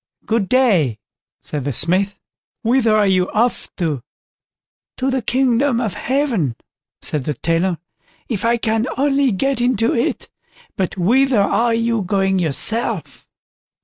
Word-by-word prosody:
"Good 220 -4 0
day", 195 - +3 0.5
said 145 -3 -4
the 145 - -1
Smith; 185 - +1 0.4
"whither 230 -2 +3
are 210 -1 +3
you 185 -2 +2
off 235 +3 0
to?" 155 -8 -2 1.0
"To 265 +1 0
the 260 -1 0
kingdom 250 +1 +1
of 220 -6 -2
Heaven", 235 - -1 0.5
said 145 -4 -2
the 150 - -2
Tailor, 165 +5 0 0.5
"if 210 -5 -3
I 235 +1 +2
can 225 +1 0
only 275 -1 +2
get 260 +5 0
into 240 -2 +2
it"—"but 235 - -4
whither 245 +5 +3
are 230 +3 +2
you 230 -1 0
going 195 0 +1
yourself?" 180 - -1
225 Hz, 130 wpm, -19 LUFS, 185-250 Hz, 1.0 s, day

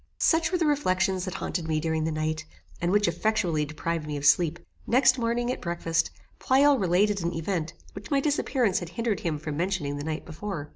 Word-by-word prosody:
Such 330 +1 +3
were 365 - +2
the 335 - +1
reflections 190 -10 +1
that 185 - -5
haunted 170 -3 -3
me 155 -1 +1
during 160 0 -1
the 160 - -1
night, 155 0 -2 0.4
and 175 +1 +1
which 205 0 +3
effectually 170 -3 0
deprived 160 +1 -3
me 150 -1 -3
of 140 - -4
sleep. 170 0 +4 0.3
Next 255 +1 +4
morning, 240 +1 0
at - - -5
breakfast, 170 -1 0 0.3
Pleyel 275 +1 +4
related 195 +2 +2
an 170 0 -2
event 165 -1 -2 0.2
which 200 +1 -9
my 280 - +3
disappearance 270 -7 +1
had 175 - -7
hindered 225 +2 -1
him 160 -3 -2
from 150 -1 -5
mentioning 170 -5 -1
the 145 - -5
night 160 +1 -4
before. 160 -2 -6
180 Hz, 200 wpm, -27 LUFS, 160-230 Hz, 0.4 s, sleep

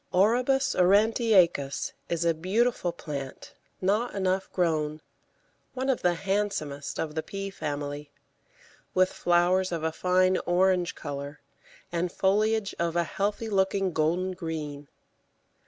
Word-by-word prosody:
Orobus 250 +8 +3
aurantiacus 195 - +3 0.2
is 170 0 -1
a 165 - +4
beautiful 185 +3 0
plant 140 -5 -7 0.3
not 210 +6 0
enough 190 0 -1
grown, 155 -4 0 0.8
one 265 +1 +1
of 255 - -2
the 175 -1 +2
handsomest 190 -7 -2
of 155 -2 -2
the 160 - -1
Pea 195 +3 -6
family, 145 -3 -5 0.9
with 185 0 +3
flowers 180 +2 +2
of 165 -2 -3
a 160 - 0
fine 185 +2 +2
orange 180 0 +2
colour, 145 0 -6 0.5
and 175 +1 -1
foliage 210 +2 +1
of 170 0 -1
a 170 - +3
healthy 205 +5 -2
looking 195 -2 +1
golden 170 +5 +1
green. 155 -5 -5
180 Hz, 120 wpm, -27 LUFS, 160-195 Hz, 0.9 s, a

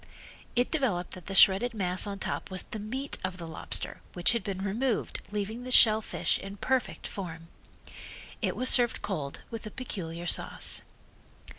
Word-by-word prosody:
It 245 +1 +2
developed 235 - 0
that 185 - -10
the 195 - -4
shredded 200 +6 +6
mass 185 -1 +2
on 200 -1 -4
top - - -4
was 185 -1 -3
the 220 - -7
meat 260 +7 -5
of 185 -1 -3
the 170 -2 -7
lobster 160 - -2
which 175 +4 +3
had 235 -1 -1
been 195 -2 -4
removed 225 +4 -1
leaving 210 +3 -4
the 255 - -7
shell 220 -3 +7
fish - - -1
in 195 +1 -8
perfect 260 +4 -1
form. 165 -4 -7 0.9
It - - -1
was 255 - 0
served 245 -2 +6
cold, 150 -8 -4
with 230 -1 -6
a - - -5
peculiar 175 -9 -5
sauce. - - 0
200 Hz, 170 wpm, -29 LUFS, 185-240 Hz, 0.9 s, shell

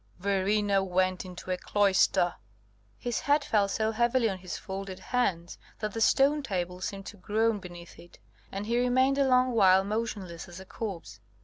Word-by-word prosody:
Verena 200 +1 +1
went 185 0 0
into 180 0 -7
a 180 - 0
cloister!" 195 -3 +2 0.6
His 240 -1 -2
head 290 0 +2
fell 205 -2 +2
so 220 +2 -1
heavily 235 +1 +2
on 190 - -6
his 185 -1 -6
folded 190 -1 -6
hands, 180 -9 -2 0.2
that 215 -2 -4
the 225 - -3
stone 280 +6 +4
table 180 -7 -4
seemed 195 +1 -5
to 205 - -9
groan 215 +3 0
beneath 175 -2 -11
it, 175 - -16 0.3
and 195 +1 -4
he 235 +2 +1
remained 260 +2 +2
a 275 - +3
long 255 0 +3
while 190 -4 +5
motionless 200 -5 -4
as 175 +1 -10
a 190 - -10
corpse. 170 - -7
200 Hz, 175 wpm, -28 LUFS, 185-230 Hz, 0.6 s, while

